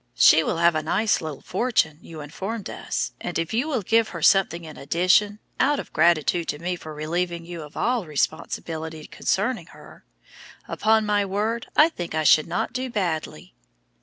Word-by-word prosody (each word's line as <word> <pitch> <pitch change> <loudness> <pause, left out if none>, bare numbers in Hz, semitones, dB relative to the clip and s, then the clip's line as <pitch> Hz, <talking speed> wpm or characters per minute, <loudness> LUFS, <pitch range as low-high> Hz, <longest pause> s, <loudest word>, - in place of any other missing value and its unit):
She 160 - +7
will 165 - -1
have 170 0 +4
a 155 - 0
nice 210 +8 +1
little 155 -3 -6
fortune, 185 -8 0
you 160 -2 -10
informed 195 +9 -5
us, - - -3
and 175 - -3
if 165 +3 -2
you 245 +7 0
will 260 -9 -1
give 225 +3 +2
her - - -7
something 175 -4 +3
in 155 - -10
addition, 185 +7 +2 0.2
out 285 +1 +3
of - - -8
gratitude 170 +1 +2
to 145 - -2
me 175 +3 -3
for 160 -2 -10
relieving 170 +3 -3
you 170 -1 -7
of 150 0 -11
all 240 -6 0
responsibility 160 +1 -3
concerning - - -1
her, - - -15 0.6
upon 220 0 +2
my 205 -1 +2
word 210 +4 -2
I 305 - +8
think 175 - -6
I 155 - +1
should 155 0 +5
not - - -2
do 255 0 -3
badly!" 165 - -3
175 Hz, 180 wpm, -24 LUFS, 155-215 Hz, 0.6 s, I